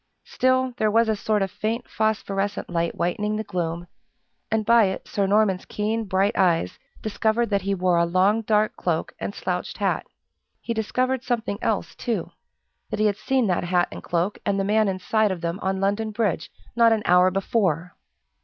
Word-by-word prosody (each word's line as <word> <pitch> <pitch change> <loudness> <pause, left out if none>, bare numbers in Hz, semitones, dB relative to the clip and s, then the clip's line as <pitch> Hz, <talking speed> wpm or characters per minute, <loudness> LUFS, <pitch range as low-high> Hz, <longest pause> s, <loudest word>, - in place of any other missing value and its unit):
Still, 260 - +1
there 215 - +2
was 230 +2 +3
a 220 - +1
sort 210 0 0
of 190 - -3
faint 225 +3 -3
phosphorescent 205 -3 -1
light 170 -1 -1
whitening 210 +5 -1
the 215 - -2
gloom, 175 -4 -3 0.6
and 220 -1 0
by 235 -1 +6
it 190 0 -4
Sir 200 -1 0
Norman's 200 -2 +2
keen 220 +2 -2
bright 195 +1 +1
eyes 170 - +1 0.2
discovered 220 +2 0
that 200 -1 +2
he 195 +1 -1
wore 180 -1 +2
a 170 - +3
long 190 +5 +3
dark 215 0 +1
cloak - - -2
and - - -4
slouched - - -3
hat. - - -1 0.5
He 235 - -3
discovered 255 +3 -1
something 230 -4 -2
else, - - -1
too - - -3 0.6
that - - -3
he 215 - +3
had 205 -1 +1
seen 255 +3 +1
that 180 -3 0
hat 175 0 +1
and - - -8
cloak, 175 +4 -1
and 200 0 0
the - - +1
man 215 +2 +2
inside 205 +3 +1
of 185 -3 -4
them 170 +2 -3
on 190 0 -1
London 205 +3 0
Bridge, 210 -7 -1 0.3
not 230 -1 +5
an 220 -2 +1
hour 180 +1 +5
before. 185 -3 -1
205 Hz, 185 wpm, -24 LUFS, 185-220 Hz, 0.6 s, by